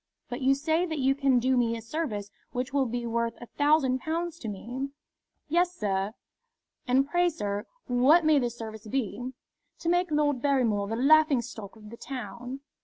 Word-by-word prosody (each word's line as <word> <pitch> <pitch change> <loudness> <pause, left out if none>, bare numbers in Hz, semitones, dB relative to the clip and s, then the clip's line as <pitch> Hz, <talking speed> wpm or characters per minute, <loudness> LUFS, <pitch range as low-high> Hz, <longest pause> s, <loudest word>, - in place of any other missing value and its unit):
But 245 +3 -5
you 270 +1 +4
say 320 +5 +1
that 315 -2 -3
you 270 -1 +3
can 275 -2 +3
do 255 +2 +2
me 230 -2 +2
a - - -7
service 225 -7 -3 0.2
which 255 +2 -3
will 275 -2 +2
be 240 +1 -3
worth 235 0 -1
a 240 - -8
thousand 290 -1 +2
pounds 335 +3 -3
to 230 - -6
me?" 245 +7 -4 0.6
"Yes, 350 +3 +2
sir." 195 - -1 0.7
"And 265 +2 +3
pray, 350 +3 +3
sir, 205 -10 -3 0.2
what 270 +7 +4
may 310 -2 +5
this 240 -2 -2
service 220 -1 -8
be?" 245 0 -2 0.5
"To 335 - -2
make 355 +1 +2
Lord 295 -4 +1
Barrymore 240 -8 +2
the 225 - -2
laughing 285 0 +5
stock 220 -4 -9
of 210 -1 -13
the 235 - -9
town." 250 0 -6
255 Hz, 180 wpm, -28 LUFS, 230-300 Hz, 0.7 s, may